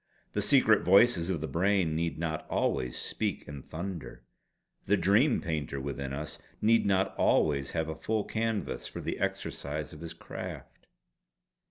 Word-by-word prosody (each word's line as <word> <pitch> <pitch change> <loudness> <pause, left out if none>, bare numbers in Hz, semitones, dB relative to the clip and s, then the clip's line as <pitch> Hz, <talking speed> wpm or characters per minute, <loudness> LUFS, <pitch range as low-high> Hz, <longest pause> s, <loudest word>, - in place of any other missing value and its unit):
The - - 0
secret - - +5
voices 95 -2 +5
of 85 -5 -1
the 80 - -2
brain 90 -2 +2
need 85 0 -1
not 80 -1 -3
always 65 -1 0
speak - - -2
in 70 -1 -7
thunder; 85 -5 -6 0.6
the - - +4
Dream 110 - +4
Painter 75 -4 -2
within 70 0 -4
us 75 +3 -5 0.2
need 115 0 +4
not 95 -1 +2
always 70 -3 +2
have 80 -1 0
a 80 - -3
full 110 +6 -1
canvas 110 -3 -2
for - - -7
the - - -3
exercise 75 +3 -3
of 75 - -11
his 85 -1 -7
craft." - - -8
85 Hz, 155 wpm, -30 LUFS, 75-100 Hz, 0.6 s, secret